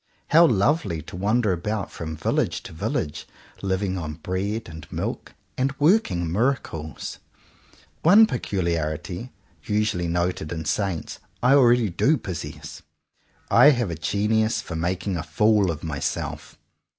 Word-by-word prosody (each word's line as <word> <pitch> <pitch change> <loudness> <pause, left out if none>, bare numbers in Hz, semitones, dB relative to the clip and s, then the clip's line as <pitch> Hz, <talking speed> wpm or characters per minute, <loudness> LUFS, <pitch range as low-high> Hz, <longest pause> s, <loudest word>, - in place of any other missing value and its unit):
How 165 +2 +7
lovely 100 - +1
to 80 - -10
wander 105 +3 +1
about 105 +4 -3
from 80 -1 -6
village - - -1
to - - -10
village, 75 -1 -3 0.3
living 95 -1 -1
on 75 -2 -5
bread 95 +6 -3
and 80 -2 -11
milk, - - -4 0.2
and 135 +1 0
working 145 - +2
miracles! 90 - -2 0.8
One 200 +7 +7
peculiarity, 90 - -2 0.3
usually 105 -5 0
noted 85 -2 -1
in 80 -1 -4
saints, 95 -6 -2 0.2
I 125 +2 +5
already 120 -6 +5
do 150 - +3
possess: 90 - -7 0.7
I 145 - +8
have 120 - +1
a - - -3
genius 105 +6 +1
for 85 - -6
making 90 +3 -1
a - - -2
fool 105 +5 +2
of 80 -3 -4
myself. 80 -4 -4
95 Hz, 130 wpm, -24 LUFS, 85-115 Hz, 0.8 s, I